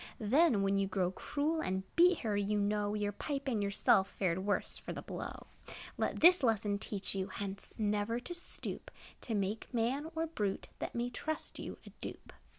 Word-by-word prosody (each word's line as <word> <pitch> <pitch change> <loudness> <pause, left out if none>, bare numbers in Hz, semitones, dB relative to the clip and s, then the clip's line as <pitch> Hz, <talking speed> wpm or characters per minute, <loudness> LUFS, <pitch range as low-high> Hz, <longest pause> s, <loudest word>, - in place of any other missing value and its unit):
Then, 235 0 +4
when 195 0 +2
you 195 - +1
grew 185 -2 0
cruel 300 - -1
And 190 -4 -1
beat 355 +1 +6
her, 215 -3 0
you 205 +1 +1
know 205 0 +1
Your 205 -1 0
pipe 275 +6 -4
and 230 -5 +1
yourself 200 -1 +3
Fared 180 -3 0
the - - -2
worst 200 +1 -1
for - - -5
the - - -6
blow. - - -6 0.5
Let - - -1
this 355 +1 +9
lesson 215 -4 +2
teach 200 -2 -2
you, 190 -1 -1
Hence 195 -1 -5
never 210 +2 +1
to 250 +8 -6
stoop 350 - -7 0.3
To 225 - -2
make 200 +2 -2
man, 260 +6 0
or 325 0 +1
brute, 210 -12 -2
That - - -4
may 240 +1 -1
trust 315 +5 -4
you, - - -6
a - - -11
dupe. - - -7
210 Hz, 190 wpm, -34 LUFS, 200-270 Hz, 0.5 s, this